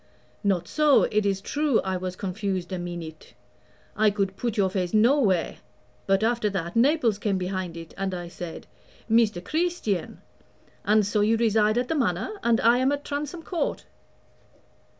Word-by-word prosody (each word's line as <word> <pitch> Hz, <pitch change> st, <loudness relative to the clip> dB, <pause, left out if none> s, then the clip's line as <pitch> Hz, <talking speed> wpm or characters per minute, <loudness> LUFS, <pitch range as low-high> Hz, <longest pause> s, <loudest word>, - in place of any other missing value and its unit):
"Not 185 Hz, -4 st, +1 dB
so. 300 Hz, -2 st, +4 dB
It 210 Hz, -1 st, +1 dB
is 195 Hz, -1 st, -1 dB
true 290 Hz, +2 st, +1 dB
I 190 Hz, -1 st, -2 dB
was 185 Hz, 0 st, -4 dB
confused 190 Hz, -1 st, -3 dB
a 185 Hz, -, -3 dB
meenute 170 Hz, -3 st, -8 dB, 0.6 s
I 215 Hz, 0 st, +4 dB
could 195 Hz, -2 st, -2 dB
put 235 Hz, +1 st, -3 dB
your 190 Hz, -2 st, +2 dB
face 185 Hz, 0 st, -1 dB
nowhere; 215 Hz, -, +3 dB, 0.5 s
but, 195 Hz, +1 st, +2 dB
after 230 Hz, -2 st, +1 dB
that, 175 Hz, -3 st, -4 dB
Naples 240 Hz, -4 st, +3 dB
came 205 Hz, -2 st, 0 dB
behind 185 Hz, -2 st, -4 dB
it, 165 Hz, -1 st, -10 dB
and 195 Hz, 0 st, -2 dB
I 175 Hz, -1 st, -6 dB
said, 170 Hz, -1 st, -8 dB, 0.4 s
Mr. 220 Hz, -5 st, +2 dB
Creesstian. 315 Hz, -, -1 dB, 0.7 s
And 210 Hz, 0 st, +3 dB
so 205 Hz, +1 st, 0 dB
you 220 Hz, +2 st, +3 dB
reside 220 Hz, -1 st, +2 dB
at 245 Hz, 0 st, 0 dB
the -, -, -1 dB
Manor, 230 Hz, -, -1 dB
and 235 Hz, -1 st, +3 dB
I 235 Hz, +2 st, +4 dB
am 260 Hz, +2 st, +2 dB
at 285 Hz, 0 st, -3 dB
Transome 295 Hz, +4 st, -4 dB
Court." 345 Hz, 0 st, -3 dB
210 Hz, 165 wpm, -25 LUFS, 185-235 Hz, 0.7 s, so